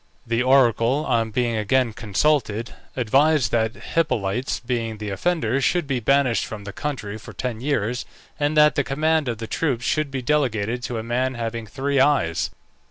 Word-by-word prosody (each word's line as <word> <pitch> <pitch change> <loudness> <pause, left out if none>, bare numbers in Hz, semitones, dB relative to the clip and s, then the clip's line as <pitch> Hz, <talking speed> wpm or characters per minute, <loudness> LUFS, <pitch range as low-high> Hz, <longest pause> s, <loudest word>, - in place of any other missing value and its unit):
The 115 +1 0
oracle, 130 +1 +3
on 115 -3 +1
being 120 +1 0
again 115 +2 +1
consulted, 115 +1 0 0.2
advised 135 +2 +3
that 110 -1 +1 0.2
Hippolytes, 125 -7 0
being 115 -3 -3
the 105 -1 -5
offender, 135 - 0
should 175 +4 +1
be 135 -3 -1
banished 135 0 +2
from 105 -2 -7
the 100 0 -7
country 110 -8 -4
for - - -11
ten 120 -3 -4
years, 125 -3 -1 0.4
and 145 +1 0
that 150 0 +6
the 145 - +1
command 155 +2 +1
of 120 -2 -2
the 115 - -5
troops 125 -1 -1
should 155 +1 0
be 135 -2 -4
delegated 120 -5 0
to 120 - -3
a 110 - -3
man 125 +3 -1
having 115 -1 -4
three 135 +6 -1
eyes. 130 - +2
125 Hz, 170 wpm, -23 LUFS, 115-140 Hz, 0.4 s, that